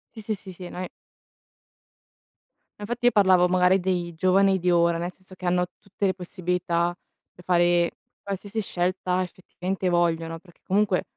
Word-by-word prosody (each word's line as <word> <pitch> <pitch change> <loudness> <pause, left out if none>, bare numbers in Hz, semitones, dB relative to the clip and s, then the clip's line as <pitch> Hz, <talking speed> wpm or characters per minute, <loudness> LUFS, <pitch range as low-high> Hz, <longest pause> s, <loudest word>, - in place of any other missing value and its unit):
Sì 220 - -7
sì 215 +1 -2
sì 195 -1 -11
sì, 180 0 -9
no 180 - -6
i - - -5 1.9
No 205 - -5
infatti 240 +2 0
io - - +6
parlavo 185 -4 +5
magari 180 +1 +4
dei 175 -2 -1
giovani 190 +2 +4
di 180 0 +1
ora, 170 -1 +3
nel 175 +2 -3
senso 185 +1 -16
che 185 - -9
hanno 180 0 +2
tutte 200 +1 -4
le 190 - +2
possibilità 180 -2 -1 0.4
per 180 - -16
fare 175 -1 +3 0.3
qualsiasi 200 +2 -4
scelta 185 0 -1
effettivamente 185 +1 -4
vogliono, 165 -1 0
perché 175 -1 -22
comunque 195 -1 +2
180 Hz, 160 wpm, -25 LUFS, 175-190 Hz, 1.9 s, io